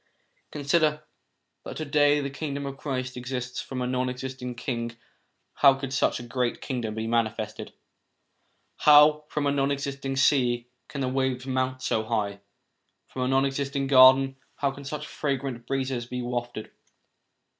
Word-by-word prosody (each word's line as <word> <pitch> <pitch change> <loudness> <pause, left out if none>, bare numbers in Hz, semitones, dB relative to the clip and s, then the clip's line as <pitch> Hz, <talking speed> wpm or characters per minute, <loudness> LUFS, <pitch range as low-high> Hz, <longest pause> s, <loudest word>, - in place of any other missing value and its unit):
Consider 150 +1 +1 0.6
that - - -7
to 155 - -3
day 145 0 +3
the 140 -1 -4
Kingdom 140 0 -4
of 140 0 -5
Christ 130 -2 -4
exists: 125 0 -4
from 130 -1 -4
a - - -1
non 125 0 0
existing 125 -1 -6
king 115 -1 -4 0.6
how 140 -2 +6
could 135 -1 -5
such 135 - +1
a - - -7
great 120 0 -2
kingdom 120 -5 -4
be 110 0 -3
manifested? 110 -2 -2 1.1
How, 150 0 +6
from 150 -1 -1
a 140 - +2
non 140 -1 +1
existing 140 -1 -3
sea, 125 -3 +2 0.2
can 140 - -5
the 130 - 0
waves 130 -1 -1
mount 130 0 -1
so 110 - 0
high? 105 -3 -2 0.7
From 130 - -5
a 125 - +1
non 135 +1 +3
existing 140 0 -2
garden, 135 0 +6 0.2
how 140 -1 0
can 140 +1 -11
such 150 +1 -5
fragrant 135 -6 -3
breezes 130 -3 -2
be 125 0 -4
wafted 120 -2 -4
130 Hz, 155 wpm, -26 LUFS, 125-140 Hz, 1.1 s, how